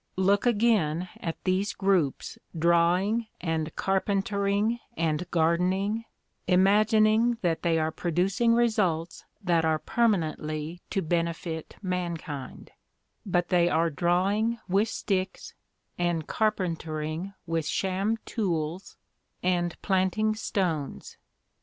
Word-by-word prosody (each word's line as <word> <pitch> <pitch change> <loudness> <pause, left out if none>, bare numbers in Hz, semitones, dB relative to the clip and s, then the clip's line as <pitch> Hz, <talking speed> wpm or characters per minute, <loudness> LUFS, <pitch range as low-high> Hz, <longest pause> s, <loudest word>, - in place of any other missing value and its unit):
Look, 200 +4 +3
again, 205 -8 +2
at 165 -1 -4
these 195 +3 0
groups 190 -8 0 0.2
drawing, 175 +7 +2
and 160 -2 -2
carpentering, 200 +3 0 0.2
and 165 +2 -1
gardening, 185 +7 +1 0.4
imagining 215 +5 +4
that 165 -2 +1
they 165 -2 +2
are 160 0 0
producing 195 +9 +1
results 195 -8 0 0.2
that 170 -3 +2
are 160 -1 +2
permanently 160 -4 -1
to 195 -3 -1
benefit 165 -1 -2
mankind; 170 -7 -4 0.6
but 175 -2 +1
they 175 -2 +4
are 165 0 +2
drawing 195 +8 +1
with 200 +4 +2
sticks, 190 -1 -3 0.5
and 170 -3 0
carpentering 170 -3 -2
with 165 -2 -1
sham 195 +6 0
tools, 175 -4 -3 0.5
and 175 -1 0
planting 195 +3 +1
stones. 180 -9 -3
180 Hz, 100 wpm, -27 LUFS, 165-205 Hz, 0.6 s, imagining